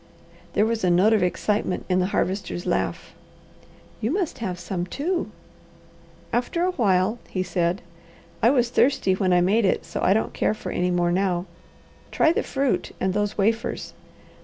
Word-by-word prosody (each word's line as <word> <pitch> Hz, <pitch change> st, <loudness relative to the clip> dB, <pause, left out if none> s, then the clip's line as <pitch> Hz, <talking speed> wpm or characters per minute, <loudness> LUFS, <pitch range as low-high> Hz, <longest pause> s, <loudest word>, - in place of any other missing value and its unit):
There 210 Hz, -, +3 dB
was 225 Hz, -1 st, -1 dB
a 180 Hz, -, +3 dB
note 185 Hz, +6 st, +4 dB
of 215 Hz, -, +3 dB
excitement 185 Hz, +1 st, -1 dB
in 185 Hz, 0 st, +2 dB
the 185 Hz, -, +1 dB
Harvester's 190 Hz, -2 st, -2 dB
laugh. -, -, -2 dB, 0.9 s
"You 220 Hz, -, 0 dB
must 340 Hz, -4 st, -1 dB
have 185 Hz, -6 st, -3 dB
some, 180 Hz, 0 st, -4 dB
too!" 340 Hz, -, -2 dB, 1.0 s
"After 250 Hz, +8 st, 0 dB
a 365 Hz, -, +2 dB
while," 205 Hz, -, +1 dB
he 185 Hz, -, -1 dB
said. 180 Hz, 0 st, -1 dB, 0.6 s
"I 230 Hz, -, +5 dB
was 245 Hz, -3 st, +2 dB
thirsty 245 Hz, -8 st, +3 dB
when 185 Hz, 0 st, +1 dB
I 180 Hz, 0 st, +4 dB
made 205 Hz, +6 st, +3 dB
it, 190 Hz, -, +1 dB
so -, -, -5 dB
I 190 Hz, -, +4 dB
don't 220 Hz, -, -1 dB
care -, -, 0 dB
for -, -, -6 dB
any 180 Hz, 0 st, 0 dB
more 175 Hz, -1 st, +1 dB
now. 180 Hz, -1 st, 0 dB, 0.6 s
Try 320 Hz, -, +3 dB
the -, -, +1 dB
fruit 275 Hz, -2 st, -1 dB
and 190 Hz, 0 st, 0 dB
those 205 Hz, +1 st, -1 dB
wafers. 225 Hz, +3 st, -1 dB
200 Hz, 170 wpm, -24 LUFS, 180-230 Hz, 1.0 s, I